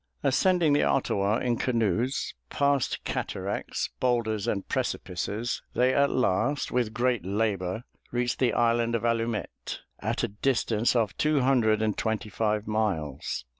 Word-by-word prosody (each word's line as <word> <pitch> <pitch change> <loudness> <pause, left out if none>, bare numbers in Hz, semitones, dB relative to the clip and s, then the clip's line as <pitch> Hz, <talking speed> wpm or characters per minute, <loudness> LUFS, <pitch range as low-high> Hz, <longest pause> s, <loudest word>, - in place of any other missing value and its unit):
Ascending 170 +2 +3
the 145 - +4
Ottawa 105 -4 +1
in 120 -1 0
canoes, 115 +1 0 0.2
past 140 -2 +1
cataracts, - - -3
boulders, 115 -5 0
and 100 -2 -1
precipices, 105 +6 -2
they 130 +1 +3
at 140 0 +4
last, 130 +5 +1
with 120 -3 +1
great 120 -2 0
labor, 100 0 -1 0.3
reached 120 0 -1
the 125 -3 +3
island 115 +1 +2
of 115 - -1
Allumette, 115 -1 -2 0.2
at - - -2
a - - +2
distance 115 +1 +1
of 110 -5 +1
two 150 -2 +2
hundred 115 -5 +3
and 110 -1 0
twenty 110 -1 -1
five 105 0 0
miles. 95 - -2
115 Hz, 135 wpm, -27 LUFS, 105-125 Hz, 0.3 s, the